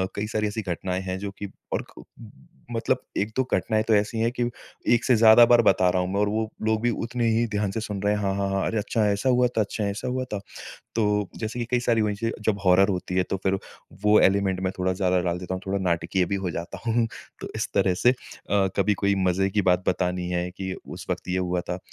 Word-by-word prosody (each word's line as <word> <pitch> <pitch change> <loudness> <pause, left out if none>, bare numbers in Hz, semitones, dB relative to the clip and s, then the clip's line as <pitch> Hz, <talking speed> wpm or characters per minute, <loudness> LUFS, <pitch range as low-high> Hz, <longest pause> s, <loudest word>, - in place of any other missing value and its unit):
कई 105 +1 -2
सारी 105 -1 -1
ऐसी 105 +2 -3
घटनाएँ 90 0 -3
हैं 95 0 -3
जो 100 0 -4
कि 100 -1 -5 0.2
और - - -1
क - - -10 0.7
मतलब - - 0 0.2
1-2 110 +6 0
घटनाएँ 110 -1 +1
तो 110 0 +1
ऐसी 105 +2 0
है 115 +1 +2
कि 125 -1 -2 0.5
1 120 - +2
से 125 - +4
ज़्यादा 110 +1 +8
बार 120 0 +6
बता 95 -4 +4
रहा 90 - +1
हूँ 90 - -2
मैं, 100 - 0
और 105 0 +2
वो 110 +1 -1 0.2
लोग 110 0 +1
भी 120 - +2
उतने 115 0 -1
ही 115 +1 +2
ध्यान 105 -2 -1
से 115 - -3
सुन 100 -3 -4
रहे 105 +1 +2
हैं। 105 - -1
हाँ, 95 -1 0
हाँ, 100 0 -1
हाँ। 95 0 0
अरे 115 - -1
अच्छा। 105 +1 0
ऐसा 100 +6 0
हुआ 125 0 +4
था? 120 -2 0
अच्छा, 105 +1 -3
ऐसा 100 +4 -3
हुआ 130 +1 -1
था? 105 - -1 0.6
तो, 105 -3 +1
जैसे 110 +2 -4
कि - - 0
कई 125 -1 +2
सारी 115 -2 +2
वही 105 -1 0
से 115 +2 -2
जब 105 -2 +2
हॉरर 95 +2 +5
होती 90 -1 -2
है, 95 - +4
तो 95 - -3
फिर 95 0 +2 0.4
वो 105 0 +5
एलिमेंट 95 -1 +2
मैं 95 - -1
थोड़ा 95 0 +1
ज़्यादा 90 -1 +1
डाल 90 0 -1
देता 90 +1 -4
हूँ, 95 - -4
थोड़ा 100 +1 0
नाटकीय 90 0 0
भी 100 - -1
हो 95 -2 -2
जाता 85 +3 -6
हूँ। 115 0 +2 0.3
तो, - - -6
इस - - -2
तरह 95 - +3
से 120 +7 +4
अ, 100 -5 -2
कभी 100 +1 +2
कोई 100 0 +1
मज़े 95 +2 +2
की 105 +1 +1
बात 90 0 +2
बतानी 90 -1 0
है 90 0 -1
कि, 95 +1 -5
उस - - -8
वक़्त - - -3
ये 90 +1 0
हुआ 90 -1 0
था। 90 +1 -5
100 Hz, 250 wpm, -25 LUFS, 95-110 Hz, 0.7 s, ज़्यादा